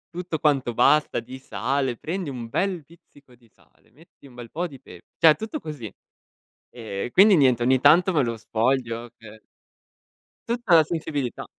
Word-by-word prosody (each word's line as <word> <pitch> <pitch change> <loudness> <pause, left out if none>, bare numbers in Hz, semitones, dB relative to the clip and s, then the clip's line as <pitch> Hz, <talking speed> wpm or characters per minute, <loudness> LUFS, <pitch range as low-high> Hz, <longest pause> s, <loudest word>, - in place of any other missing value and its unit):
Tutto 175 -3 -4
quanto 135 -6 0
basta 150 -5 +3
di 130 +3 -10
sale: 130 +2 -2
"Prendi 175 -1 -5
un 120 -3 -7
bel 180 +3 -2
pizzico 145 -5 -22
di 120 -2 -24
sale, - - -31
metti 150 0 -20
un 125 - -18
bel 120 -2 -11
po' 175 +3 -3
di 135 -5 -13
pepe", 90 -1 -16
cioè 160 -2 +6
tutto 220 - -6
così. 140 -9 -8 0.8
Ehm, 110 -2 -6
quindi 195 -1 +6
niente, 125 -4 +3
ogni 130 +1 +3
tanto 170 +7 +5
me 150 -4 +2
lo 115 -2 -2
sfoglio 115 +1 -2
per 110 -1 -15 1.1
Tutta 235 -7 +2
la 160 - +7
sensibilità. 150 -6 -4
135 Hz, 165 wpm, -24 LUFS, 120-165 Hz, 1.1 s, la